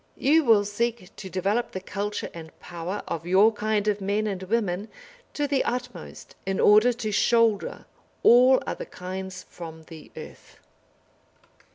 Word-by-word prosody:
You 315 +3 +3
will 220 -5 +4
seek 220 -1 -3
to 190 - -8
develop 195 +6 -1
the 185 - -3
culture 205 +2 -4
and 160 -1 -11
power 175 +3 -6
of 165 +1 -5
your 200 +5 +5
kind 215 0 -1
of 205 -1 0
men 205 +2 0
and 195 -3 -3
women 200 -1 -1 0.5
to 290 -1 0
the 275 -1 +1
utmost 250 - -6
in 195 -1 -2
order 215 +4 +6
to 230 -3 -4
shoulder 230 0 +1 0.4
all 255 +2 +6
other - - -5
kinds 185 0 -7
from 160 -2 -10
the 160 -1 -13
earth. - - -12
205 Hz, 150 wpm, -25 LUFS, 185-230 Hz, 0.5 s, order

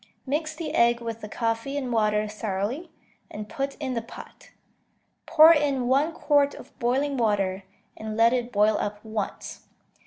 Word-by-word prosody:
Mix 310 +3 -2
the 315 -1 -5
egg 235 0 +3
with 230 -1 -6
the 210 - -7
coffee 230 +5 -2
and 255 -4 -3
water 215 -1 +1
thoroughly, 215 - -3 0.4
and 210 0 -7
put 275 +5 -4
in 270 -3 -4
the 230 - -2
pot. 225 - -13 0.8
Pour 325 0 +8
in 280 -5 0
one 280 +6 +2
quart 290 -3 +2
of - - -13
boiling 270 +4 0
water, 200 -4 0 0.3
and 220 0 -6
let 230 +1 +5
it 245 -1 -1
boil 210 0 +3
up 210 +1 -4
once. 215 -2 -5
235 Hz, 160 wpm, -25 LUFS, 215-280 Hz, 0.8 s, Pour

